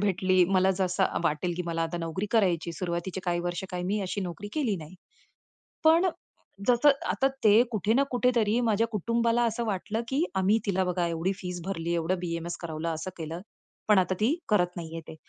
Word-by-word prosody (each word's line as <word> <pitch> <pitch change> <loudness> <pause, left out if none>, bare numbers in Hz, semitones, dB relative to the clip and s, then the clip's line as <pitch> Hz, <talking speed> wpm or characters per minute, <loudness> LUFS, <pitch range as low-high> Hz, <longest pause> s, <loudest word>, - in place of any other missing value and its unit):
भेटली, 185 -2 +3
मला 190 0 +3
जसं 190 0 +1
वाटेल 160 +3 0
की 180 - -2
मला 165 -1 -1
आता 165 +1 -2
नोकरी 165 +4 -3
करायची, 175 -7 +2
सुरुवातीचे 175 +2 -3
काही 175 -1 0
वर्ष 175 +1 -3
काय, 180 -1 -3
मी 200 +4 -1
अशी 195 +1 -3
नोकरी 190 +2 -5
केली 250 -10 0
नाही. 160 +1 -10 0.9
पण 330 +4 +5 0.6
जसं 245 +4 +6 0.2
आता 270 - +2 0.2
ते 215 +2 +7
कुठे 215 0 +1
ना 270 - +4
कुठेतरी 245 -3 +2
माझ्या 225 0 +2
कुटुंबाला 230 +3 +1
असं 235 +1 -1
वाटलं, 210 +2 -2
की 280 +7 +1
आम्ही 195 +4 +3
तिला 190 -1 +1
बघा 180 -1 0
एवढी 170 +3 -1
फीस 180 -1 -5
भरली, 170 -3 -2
एवढं 170 +2 0
BAMS 170 0 -3
करवलं, 160 0 -4
असं 160 +4 -5
केलं, 165 +1 -5 0.5
पण 210 -2 +6
आता 185 0 +2
ती 235 +8 +3
करत 180 -4 +2
नाहीये 165 -1 -6
ते. - - -8
185 Hz, 185 wpm, -28 LUFS, 170-215 Hz, 0.9 s, ते